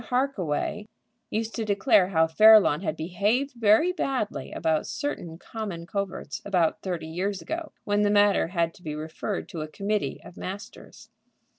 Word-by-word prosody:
Harkaway 210 - -1 0.4
used 225 +1 -2
to 230 - -2
declare 205 -1 +3
how 165 -4 +3
Fairlawn 210 -2 +6
had 160 -4 -2
behaved 205 - 0
very 235 +9 +4
badly 265 - -2
about 160 -2 0
certain 175 - -4
common 195 -4 -6
coverts 195 0 -4
about 180 -5 +1
thirty 175 -4 -3
years 185 +5 -2
ago, 325 0 -5
when 205 0 +1
the 205 - +3
matter 205 -2 +4
had 170 -2 0
to - - -19
be 155 -3 -5
referred 160 +6 -4
to 165 - -5
a 155 - -4
committee 200 +6 -2
of 180 - -13
masters. 195 +2 -9
200 Hz, 155 wpm, -26 LUFS, 170-220 Hz, 0.4 s, Fairlawn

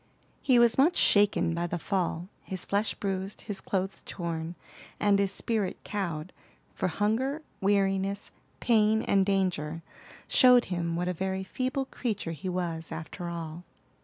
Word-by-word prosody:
He 260 -3 +4
was 235 +1 +5
much 320 +6 +5
shaken 205 -5 +4
by 170 +1 -1
the 175 - -2
fall, 175 -1 -1
his 185 -2 -4
flesh 205 +2 0
bruised, 195 0 -3
his 200 -2 -3
clothes 190 0 -2
torn, 170 -1 -4 0.4
and 200 -1 +3
his 200 -1 +2
spirit 210 -2 -1
cowed; 175 -5 -3 0.4
for - - -1
hunger, 245 - 0 0.2
weariness, 195 0 +1 0.3
pain, 220 -1 +3
and 195 -1 +3
danger, 180 -5 0 0.4
showed 250 -1 +6
him 170 -1 -1
what 175 +1 -1
a 180 - 0
very 190 +2 -2
feeble 260 +6 -2
creature 215 -10 -3
he 165 +4 -5
was, 170 -3 -3
after 165 +2 -6
all. 170 0 -6
190 Hz, 145 wpm, -29 LUFS, 175-210 Hz, 0.4 s, showed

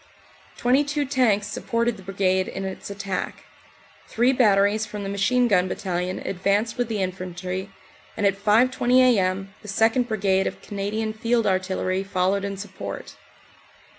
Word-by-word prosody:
Twenty 255 +4 +3
two 290 0 -1
tanks 245 -7 +2
supported 230 +2 -1
the 195 - -12
Brigade 190 0 0
in 195 - -5
its 190 +1 -6
attack. 195 -2 -4 0.6
Three 245 +3 +2
batteries 210 -3 +3
from 210 -1 -6
the 195 - -4
Machine 245 +5 +2
Gun 185 -4 +3
Battalion 180 -1 -3
advanced 200 +4 0
with 245 -1 -1
the 215 -4 -1
infantry, 185 +1 -4 0.5
and 205 - 0
at 200 - +4
5.20 245 +3 +3
a.m. 195 -6 +3
the 210 - -12
2nd. 225 +5 +2
Brigade 195 -4 +1
of - - -5
Canadian 210 +2 -3
Field 230 +1 0
Artillery 185 0 0
followed 195 0 0
in 200 -1 -4
support. 195 -1 -7
200 Hz, 145 wpm, -24 LUFS, 190-230 Hz, 0.6 s, at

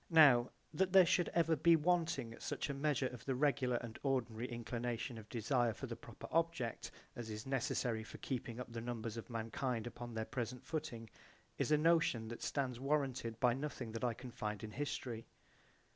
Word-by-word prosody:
Now 140 -8 +7 0.2
that 190 -1 +1
there 190 -2 +9
should 175 +1 +3
ever 165 -1 +3
be 165 +3 +6
wanting 160 -7 +1
such 150 - -2
a - - -2
measure 140 -1 +1
of 125 -2 -4
the 135 - -1
regular 135 -2 +2
and 115 -2 -4
ordinary 125 -4 0
inclination 120 0 -3
of 110 - -13
desire 120 0 +1
for - - -6
the - - -4
proper - - -10
object 165 -8 0 0.3
I - - -8
as 115 -2 -5
is 105 0 -5
necessary 125 -3 0
for - - -9
keeping 120 -3 -4
up 125 -2 -6
the 115 - -3
numbers 115 -2 -3
of 115 - -7
mankind 115 +1 -2
upon 120 -1 -6
their 110 0 -1
present 125 0 -4
footing 150 -8 -4 0.5
is - - +1
a 150 - +7
notion 155 -8 +3
that 120 - -6
stands 130 -4 -1
warranted 135 -5 0
by 125 -1 +5
nothing 135 -3 -4
that 115 +1 -5
I 120 -2 +1
can 125 +1 -8
find 105 -2 -4
in 110 - -5
history. 120 -3 -3
125 Hz, 190 wpm, -37 LUFS, 115-145 Hz, 0.5 s, there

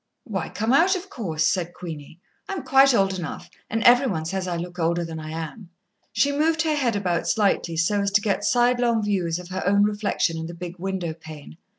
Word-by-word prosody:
"Why, 195 - -4
come 220 +4 -1
out, 360 +7 +5
of 375 +1 -7
course," 160 - -2
said 175 -2 -1
Queenie. 160 -2 -9 0.3
"I - - -2
am 355 -8 -4
quite 270 0 +5
old 195 -3 +1
enough, 165 - -7 0.2
and 225 +1 -1
every 245 +3 +6
one 160 -8 -2
says 185 +2 -3
I 175 -1 -2
look 175 +1 -6
older 170 +1 +1
than 165 -1 -6
I 155 0 -7
am." 165 +4 -7 0.4
She 285 - +2
moved 315 +3 +1
her 315 -1 +1
head 255 -7 0
about 180 -4 -1
slightly 195 -6 +1
so 200 +5 +2
as 200 - +1
to 205 - +4
get 200 -1 -1
sidelong 240 -2 +2
views 180 -5 0
of 180 0 -9
her 185 0 -3
own 200 +2 +3
reflection 205 -5 0
in 160 - -5
the 170 - -8
big 175 +1 -8
window 185 -3 -3
pane. 155 - -12
190 Hz, 220 wpm, -24 LUFS, 170-235 Hz, 0.4 s, every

